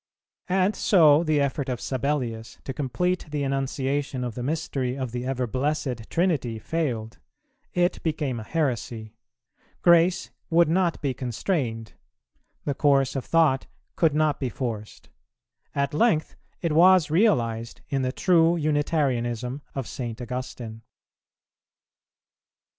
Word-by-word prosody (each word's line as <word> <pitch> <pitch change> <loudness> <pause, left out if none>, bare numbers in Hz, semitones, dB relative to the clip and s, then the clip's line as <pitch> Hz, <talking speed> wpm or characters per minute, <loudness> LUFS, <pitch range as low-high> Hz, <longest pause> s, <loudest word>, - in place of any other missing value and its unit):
And 190 +2 +2
so 160 -5 +5
the 155 -3 +2
effort 140 -1 -1
of 125 -2 -2
Sabellius 125 -4 -2
to 135 - -5
complete 175 +7 -1
the 145 -1 -2
enunciation 135 0 -1
of 120 -2 -3
the 125 - -6
mystery 135 -2 -2
of 130 -3 -3
the 125 +1 -4
Ever 130 -1 -1
blessed 130 -2 -2
Trinity 155 -10 0
failed: 115 -3 -3 0.6
it 175 0 +1
became 150 -6 -2
a - - -6
heresy; 120 -6 -2 0.7
grace 170 +1 +4 0.2
would 170 +1 +5
not 175 0 +1
be 135 -2 0
constrained; 120 - -2 0.7
the 145 - 0
course 135 -1 +2
of 135 - -3
thought 160 -5 +3 0.3
could 160 -4 +2
not 155 -1 +2
be 130 - -1
forced; 115 -5 -6 0.7
at 140 0 0
length 155 -2 +2 0.3
it 170 - +1
was 175 0 +5
realized 115 - +1
in 135 -1 0
the 130 0 0
true 170 +2 +3
Unitarianism 140 -5 0
of 135 -4 -3
St. 120 -4 -5
Augustine. 120 -2 -6
140 Hz, 125 wpm, -25 LUFS, 125-160 Hz, 0.7 s, so